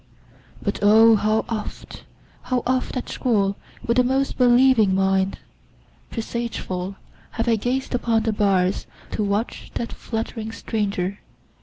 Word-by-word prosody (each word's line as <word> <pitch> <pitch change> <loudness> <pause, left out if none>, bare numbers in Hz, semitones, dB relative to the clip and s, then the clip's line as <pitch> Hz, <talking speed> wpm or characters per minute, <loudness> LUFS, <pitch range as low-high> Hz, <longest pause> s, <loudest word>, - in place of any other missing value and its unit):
But - - -1
O! 220 +2 +7
how 215 +1 +1
oft, 220 -2 -6 0.4
How 250 -1 -1
oft, 255 +1 0
at 255 - -4
school, 200 -5 +1 0.3
with 240 +2 +3
most 265 +2 0
believing 245 -5 +5
mind, 190 0 +1 0.7
Presageful, 220 -5 -4 0.4
have 230 0 -2
I 230 - +4
gazed 250 +6 -2
upon 230 -2 +1
the 220 -1 0
bars, 195 -2 +1 0.2
To 215 - -1
watch 205 +3 -2
that 235 - -3
fluttering 225 -1 -4
stranger! 200 -4 -2
225 Hz, 125 wpm, -23 LUFS, 200-240 Hz, 0.7 s, O